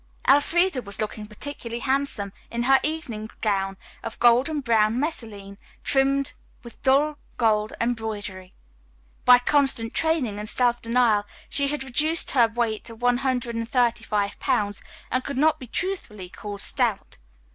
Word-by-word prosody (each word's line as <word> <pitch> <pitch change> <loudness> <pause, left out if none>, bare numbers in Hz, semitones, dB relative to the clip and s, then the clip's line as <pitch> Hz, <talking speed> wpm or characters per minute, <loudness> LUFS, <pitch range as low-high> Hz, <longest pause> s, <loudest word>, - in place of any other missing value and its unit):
Elfreda 305 +2 +3
was 200 -3 -7
looking 215 0 -4
particularly 235 +1 -6
handsome 265 -7 -1 0.2
in 235 0 -2
her 270 +2 +5
evening 245 -9 -4
gown 195 -3 0 0.2
of 225 - -6
golden 250 +6 +4
brown 230 -2 +2
messaline, 215 -9 -4 0.2
trimmed 275 +1 +2 0.3
with 235 - -13
dull 290 +3 +3 0.2
gold 215 -2 +2
embroidery. 210 -5 -3 0.7
By 250 0 +9
constant 245 -3 +1
training 290 -11 +1
and 210 0 -5
self 240 -1 +1
denial 230 -3 +2 0.2
she 280 -1 +1
had 290 -1 -2
reduced 305 +6 +1
her 240 -5 +5
weight 225 -1 -2
to 230 -1 -10
one 245 +1 +2
hundred 255 -2 -1
and 230 0 -3
thirty 240 -2 +2
five 205 -2 -1
pounds 205 -1 0 0.3
and 255 +1 0
could 280 -1 -5
not 310 +3 +3
be 255 - -9
truthfully 225 - -4
called 205 +1 -7
stout. - - -1
240 Hz, 145 wpm, -25 LUFS, 215-275 Hz, 0.7 s, By